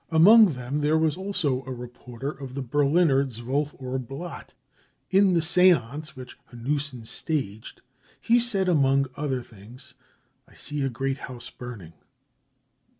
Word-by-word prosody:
Among 195 Hz, +4 st, +7 dB
them 130 Hz, +3 st, -3 dB
there 150 Hz, +2 st, +3 dB
j'.. -, -, +1 dB
was 155 Hz, -2 st, +1 dB
also 180 Hz, -9 st, -1 dB
a -, -, -4 dB
reporter 125 Hz, +2 st, -7 dB
of 135 Hz, -3 st, -9 dB
the 140 Hz, -, -3 dB
Berliner 145 Hz, +2 st, +3 dB
12 135 Hz, +4 st, -3 dB
Uhr 130 Hz, 0 st, -3 dB
Blatt. 135 Hz, +8 st, -8 dB, 0.6 s
In 190 Hz, -1 st, +4 dB
the 165 Hz, -, +2 dB
seance 155 Hz, -5 st, +3 dB
■ -, -, -31 dB
which 130 Hz, -1 st, -11 dB
Hanussen 130 Hz, 0 st, -3 dB
staged, 110 Hz, -6 st, -4 dB, 0.4 s
he 235 Hz, +1 st, +3 dB
said, 210 Hz, -6 st, +1 dB
among 140 Hz, -5 st, +3 dB
other 135 Hz, -4 st, -2 dB
things: 120 Hz, +5 st, -14 dB
u -, -, -38 dB, 0.5 s
I -, -, -23 dB
i -, -, -21 dB
see 150 Hz, 0 st, -5 dB
a 135 Hz, -, 0 dB
great 135 Hz, +2 st, -3 dB
house 125 Hz, -2 st, -9 dB
burning." 115 Hz, -10 st, -9 dB
140 Hz, 155 wpm, -25 LUFS, 125-160 Hz, 0.6 s, Among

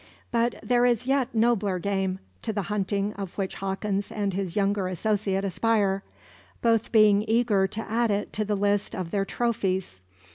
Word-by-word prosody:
But 235 Hz, 0 st, +1 dB
there 245 Hz, -1 st, +3 dB
is 245 Hz, -1 st, +2 dB
a -, -, -4 dB
yet 270 Hz, -2 st, +2 dB
nobler 220 Hz, -4 st, +2 dB
game, 190 Hz, 0 st, -1 dB, 0.2 s
to -, -, -2 dB
the 205 Hz, -2 st, -2 dB
hunting 200 Hz, 0 st, -1 dB
of 195 Hz, -3 st, -6 dB
which 195 Hz, -2 st, -2 dB
Hawkins 195 Hz, +1 st, -2 dB
and 200 Hz, -2 st, -1 dB
his 185 Hz, -2 st, -3 dB
younger 200 Hz, -2 st, +1 dB
associate 195 Hz, +1 st, 0 dB
aspire; 195 Hz, 0 st, +1 dB, 0.6 s
both 230 Hz, -1 st, +2 dB
being 210 Hz, -2 st, +5 dB
eager 220 Hz, -4 st, +3 dB
to 215 Hz, +3 st, -5 dB
add 230 Hz, +1 st, 0 dB
it 205 Hz, 0 st, -1 dB
to 215 Hz, -, -1 dB
the 210 Hz, 0 st, -1 dB
list 205 Hz, 0 st, 0 dB
of 180 Hz, -4 st, -4 dB
their 195 Hz, -1 st, 0 dB
trophies. 190 Hz, -, -1 dB
205 Hz, 175 wpm, -26 LUFS, 195-225 Hz, 0.6 s, being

